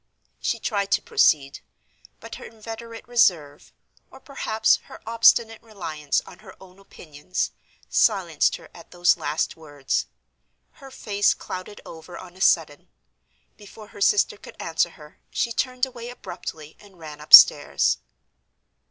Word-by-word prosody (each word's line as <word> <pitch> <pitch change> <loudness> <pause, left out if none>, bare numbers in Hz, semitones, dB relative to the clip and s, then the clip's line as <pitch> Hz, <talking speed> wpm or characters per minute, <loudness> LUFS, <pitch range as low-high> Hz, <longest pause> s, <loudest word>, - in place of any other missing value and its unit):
She - - -2
tried 200 -3 -2
to - - +2
proceed; 140 -2 +2 0.6
but - - -11
her - - -9
inveterate 225 +1 -10
reserve—or, 180 - -2
perhaps, 220 -5 0
her - - -13
obstinate 230 0 +3
reliance 160 -10 -3
on - - -14
her 200 -3 -15
own 190 0 -17
opinions—silenced 170 -2 -2
her - - -14
at - - -15
those 175 0 +2
last 150 +2 -3
words. 145 -4 -4 0.7
Her 270 - -11
face 205 -5 0
clouded 185 +3 -8
over 165 +2 -11
on 180 -1 -12
a 190 - -14
sudden. - - +1 0.7
Before 210 +1 -14
her 205 - -14
sister 205 +1 +2
could - - -15
answer 165 +1 -1
her, 150 -2 -17
she 235 - -2
turned 255 +2 -1
away 240 -2 -10
abruptly 165 -9 -9
and 200 -3 -19
ran 150 -2 -11
upstairs. 150 - +7
195 Hz, 130 wpm, -23 LUFS, 160-225 Hz, 0.7 s, upstairs